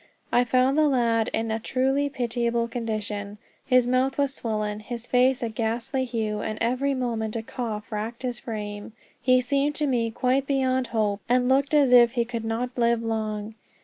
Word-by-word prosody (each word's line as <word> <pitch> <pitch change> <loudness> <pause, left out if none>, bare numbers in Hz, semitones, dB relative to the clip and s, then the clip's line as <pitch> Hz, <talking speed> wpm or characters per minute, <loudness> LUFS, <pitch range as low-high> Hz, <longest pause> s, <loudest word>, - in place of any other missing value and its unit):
I 245 +1 +4
found 255 +4 +2
the 305 - +5
lad 235 -5 +2
in 225 0 -1
a 220 - -1
truly 270 +4 0
pitiable 235 -2 -1
condition. 210 -3 -4 0.3
His 255 -2 +4
mouth 255 +2 +1
was 280 -1 +1
swollen, 215 -4 -3
his 235 +2 -6
face 255 +1 +2
a 230 - -1
ghastly 230 +4 -2
hue, 220 -3 -2
and 215 0 -3
every 255 +4 0
moment 230 -4 -2
a 225 - -3
cough 220 -3 -5
racked 220 +4 -4
his 245 -2 -3
frame. 210 -3 -6 0.3
He 255 0 +4
seemed 280 +3 0
to 300 - 0
me 240 -4 +1
quite 255 +4 0
beyond 260 -2 +1
hope, 210 -3 -1
and 250 0 +3
looked 275 +3 +2
as 280 -4 +4
if 240 -1 +7
he 240 -2 +1
could 230 -1 -5
not 240 +3 -2
live 235 -1 +2
long. 215 -1 -3
240 Hz, 180 wpm, -25 LUFS, 225-255 Hz, 0.3 s, if